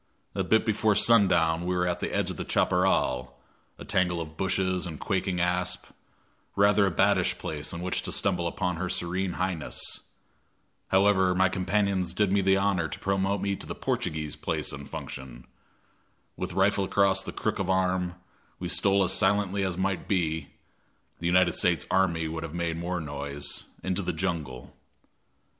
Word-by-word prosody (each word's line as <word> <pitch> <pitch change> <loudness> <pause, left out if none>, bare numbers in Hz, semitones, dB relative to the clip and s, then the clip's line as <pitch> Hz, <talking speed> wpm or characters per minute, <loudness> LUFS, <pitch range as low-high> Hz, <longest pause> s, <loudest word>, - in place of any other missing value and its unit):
A - - -1
bit 110 0 +3
before 110 -1 +2
sundown 90 -7 +4
we 90 +1 -1
were 90 0 +1
at 90 -1 -1
the - - -3
edge - - 0
of - - -8
the - - -3
chaparral 65 0 +1 0.4
a - - -9
tangle 90 -2 +1
of 80 -1 -7
bushes 95 0 0
and 80 -3 -7
quaking 95 -2 -1
asp 90 +1 0 0.7
rather 100 0 +4
a - - 0
baddish 95 +1 +2
place 75 -1 -4
in 85 - -5
which 90 +1 -1
to - - -4
stumble 90 -3 +1
upon 90 0 -2
her 90 +2 -3
serene 90 +2 -1
highness. 90 -4 -2 1.1
However, 95 -1 +3
my 95 +1 +4
companions 95 -1 0
did 105 -1 +2
me 100 0 +3
the 95 0 +3
honor 95 -4 +1
to - - -6
promote 95 0 0
me 100 0 0
to - - -7
the - - -5
"Portugee's" 75 -1 -2
place - - -2
and 70 -1 -8
function. 65 -2 -8 0.9
With 90 0 -4
rifle 95 +2 +2
across 95 0 +3
the - - -6
crook - - -2
of 95 -1 -2
arm, 90 -1 +1 0.4
we - - -5
stole 100 0 +3
as 95 0 +2
silently 100 0 +2
as 95 -2 -2
might 95 -1 -1
be 80 -6 0 0.7
the 85 - -2
United 90 +1 +4
States - - +1
army 85 -4 +2
would 80 0 -4
have 80 0 -6
made 85 -1 -1
more 90 +2 -3
noise 70 -1 -4 0.2
into 95 +1 -1
the 90 - -2
jungle. 80 -7 -4
90 Hz, 170 wpm, -27 LUFS, 85-95 Hz, 1.1 s, sundown